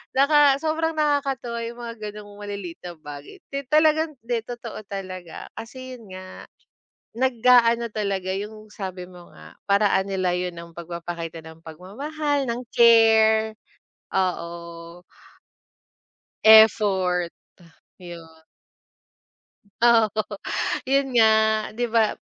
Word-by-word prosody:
naka 280 0 +5
sobrang 320 +1 -1
nakakatuwa 275 -5 -1
yung 235 +1 -9
mga 230 -1 -6
ganong 205 0 -12
malilit 200 -4 -7
na 175 -1 -8
bagay. 145 -2 -11 0.2
Ti 275 -2 -4
talagang 310 0 +3
di 235 0 -1
totoo 235 -1 -8
talaga. 185 -3 -7
Kasi 255 +3 -9
yun 225 -3 -16
nga, 185 0 -11 0.7
nag-aano 240 -2 +4
talaga 195 -3 -2
yung 215 +1 -8
sabi 185 -3 -7
mo 175 -1 -15
nga, 80 +1 -15
paraan 200 -1 +3
nila 185 -2 -1
yun 180 -1 -3
ng 170 0 -10
pagpapakita 170 -1 -6
ng 160 +1 -14
pagmamahal, 280 - -3
ng 235 +1 -3
care. 220 -2 +5 0.6
Oo. 170 -2 -4 1.4
Effort. 195 -5 +5 0.7
Ah - - -13
yun. 165 -2 -11 1.4
Oo, 230 -3 +5 0.8
yun 275 0 +3
nga 225 -2 +6 0.5
di 245 - +1
ba 225 -2 +1
215 Hz, 110 wpm, -23 LUFS, 180-240 Hz, 1.4 s, nga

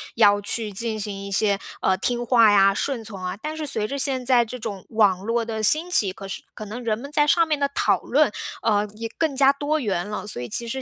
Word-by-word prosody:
要 205 -2 +5
去 215 +1 -2
进 220 +2 -3
行 200 -1 -5
一 200 - -8
些， 200 0 +1 0.2
呃， 190 - +3
听 240 +4 -2
话 230 -3 +5
呀、 195 -1 +5
顺 260 +1 -2
从 200 -4 -9
啊。 180 +2 -4
但 305 +6 -5
是 310 -2 -4
随 220 -6 -1
着 280 +3 -4
现 260 -2 -1
在 245 -2 +4
这 245 +2 -7
种 200 -5 -6
网 200 -4 +2
络 230 +1 0
的 220 -1 -4
兴 310 - +2
起， 200 - +3
可 195 - -9
是 195 - -6
可 215 - -7
能 225 +4 -7
人 220 -2 0
们 280 +5 -9
在 295 0 +3
上 335 +2 +4
面 305 -2 0
的 280 0 +1
讨 200 -3 +2
论， 285 -2 +2 0.3
呃， 210 -2 +2
也 225 +1 -5
更 315 -4 0
加 275 0 +5
多 290 +2 -1
元 200 -7 -2
了。 210 - -5
所 210 -12 -4
以 120 - -6
其 235 - 0
实 265 +3 -4
225 Hz, 270 characters per minute, -23 LUFS, 205-270 Hz, 0.3 s, 要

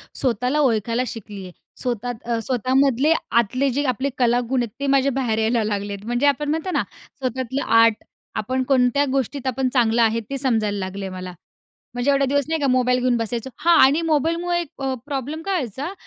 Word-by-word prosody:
स्वतःला 250 +3 0
ओळखायला 230 -3 +1
शिकली 210 -4 -8
आहे. 185 - -9 0.3
स्वतः 245 -1 -2 0.2
अ, 230 - 0
स्वतःमधले 265 +3 +2 0.3
आतले 255 +5 -1
जे 285 - +1
आपले 265 +4 -2
कलागुण 245 +1 +1
आहेत 235 - -4
ते 280 - -2
माझ्या 275 0 +3
बाहेर 240 -4 -1
यायला 225 +1 +1
लागलेत, 205 -1 -3
म्हणजे 240 +4 0
आपण 290 +1 +1
म्हणतो 320 +4 -1
ना, - - +1 0.4
स्वतःला 260 +1 -2 0.2
आर्ट 230 -1 +3 0.3
आपण 255 +5 -1
कोणत्या 265 +1 +3
गोष्टीत 270 0 -2
आपण 260 0 0
चांगलं 235 -2 +3
आहे, 225 0 +3
ते 275 - -3
समजायला 220 -6 0
लागले 190 +1 -5
मला, 185 -1 -7 0.6
म्हणजे 245 +3 +1
एवढे 275 0 +2
दिवस 285 +1 +1
नाही 320 - 0
का 280 - +2
मोबाईल 250 -1 +2
घेऊन 250 -1 +1
बसायचं. 230 +2 -3
हां 340 0 +4
आणि 280 +5 +4
मोबाईलमुळे 335 +3 0 0.2
अ, 270 -1 -1
प्रॉब्लेम 290 +2 -4
काय 390 -1 0
व्हायचा? 280 - -3
255 Hz, 180 wpm, -22 LUFS, 230-280 Hz, 0.6 s, हां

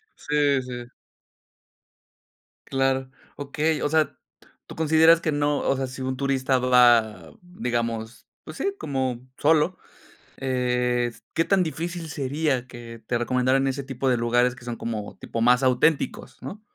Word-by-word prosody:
Sí, 145 -2 +1
sí. 125 -1 -7 1.8
Claro. 135 -1 0 0.3
Okey, 150 +3 -1
o - - +1
sea, 155 0 +1 0.5
tú - - -11
consideras 160 +1 +5
que 155 - 0
no 145 0 +1
o - - +1
sea, 135 - -1
si 130 +1 -8
un 130 0 -3
turista 135 -1 +1
va, 120 -3 +4
digamos, 120 -9 -4 0.2
pues - - -10
sí, 395 0 -1
como 130 -3 -2 0.2
solo, 160 +4 +2 0.6
eh, 125 -2 0
s 115 - -17
¿Qué 165 - +1
tan 195 -2 +3
difícil 165 +1 -4
sería 140 -2 -1
que 120 -2 -10
te 120 - 0
recomendaran 130 +3 +1
ese 135 +1 -2
tipo 135 0 -2
de 125 - +2
lugares 120 +1 +2
que 125 - -14
son 120 -1 -4
como 110 -3 -5
tipo 115 - -5
más 125 +2 +4
auténticos, 130 +4 +1
no? 210 +2 -8
130 Hz, 145 wpm, -24 LUFS, 125-150 Hz, 1.8 s, consideras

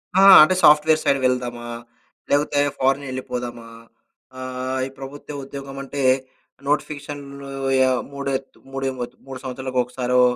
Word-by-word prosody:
ఆ! 190 - +6 0.2
అంటే 185 +4 +3
software 155 +1 +6
side 140 -1 +2
వెళ్దామా? 120 -2 -1 0.6
లేకపోతే 145 0 +2 0.2
ఫారినెళ్ళిపోదామా? 130 -3 -2 0.7
ఆహ్, 130 0 -4
ఈ - - -9
ప్రభుత్వ 145 +2 -8
ఉద్యోగమంటే 135 0 -6 0.6
నోటిఫికేషన్లు 145 -1 -3 0.4
ఆహ్, 130 - +1
మూడ 140 0 -6 0.5
మూడె 135 0 -2 0.4
మూడు 130 -1 -7
సంవత్సరాలకొకసారో, 125 -1 0
135 Hz, 100 wpm, -22 LUFS, 125-140 Hz, 0.7 s, ఆ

